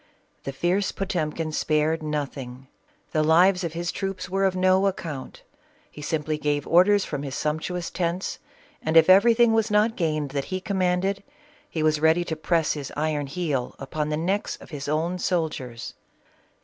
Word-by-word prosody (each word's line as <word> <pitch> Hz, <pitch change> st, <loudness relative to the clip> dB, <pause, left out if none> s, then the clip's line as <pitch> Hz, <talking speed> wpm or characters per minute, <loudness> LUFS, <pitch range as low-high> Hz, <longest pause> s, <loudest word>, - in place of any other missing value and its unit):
The 135 Hz, -, -2 dB
fierce 175 Hz, +8 st, 0 dB
Potemkin 165 Hz, -4 st, -2 dB
spared 155 Hz, +1 st, +1 dB
nothing. 135 Hz, -4 st, -4 dB, 0.5 s
The 155 Hz, -, +1 dB
lives 180 Hz, +4 st, +4 dB
of 165 Hz, -2 st, -3 dB
his 170 Hz, +1 st, -2 dB
troops 195 Hz, -2 st, -4 dB
were 195 Hz, +2 st, 0 dB
of 190 Hz, -1 st, +1 dB
no 185 Hz, +1 st, +3 dB
account. 160 Hz, -8 st, -5 dB, 0.5 s
He 150 Hz, -, -10 dB
simply 150 Hz, 0 st, -2 dB
gave 145 Hz, -1 st, 0 dB
orders 190 Hz, +4 st, +4 dB
from 145 Hz, -2 st, -4 dB
his 135 Hz, -2 st, -5 dB
sump 150 Hz, +1 st, -1 dB
tuous 180 Hz, 0 st, -4 dB
tents, 175 Hz, +1 st, -2 dB, 0.4 s
and 160 Hz, +1 st, +2 dB
if 165 Hz, +3 st, +7 dB
everything 230 Hz, +4 st, +6 dB
was 225 Hz, 0 st, +2 dB
not 210 Hz, +2 st, +3 dB
gained 155 Hz, -5 st, -1 dB
that 140 Hz, -1 st, -2 dB
he 185 Hz, -, -3 dB
commanded, 190 Hz, 0 st, 0 dB, 0.5 s
he 160 Hz, -, -2 dB
was 155 Hz, -1 st, +2 dB
ready 160 Hz, +2 st, +4 dB
to 160 Hz, -, -3 dB
press 160 Hz, 0 st, +1 dB
his 145 Hz, -3 st, -6 dB
iron 150 Hz, -2 st, -1 dB
heel 145 Hz, -5 st, -2 dB
upon 150 Hz, +3 st, -3 dB
the 150 Hz, -, -1 dB
necks 190 Hz, +6 st, -1 dB
of -, -, -15 dB
his 145 Hz, -2 st, -6 dB
own 165 Hz, +5 st, -1 dB
soldiers. 150 Hz, -10 st, -2 dB
165 Hz, 170 wpm, -25 LUFS, 150-185 Hz, 0.5 s, if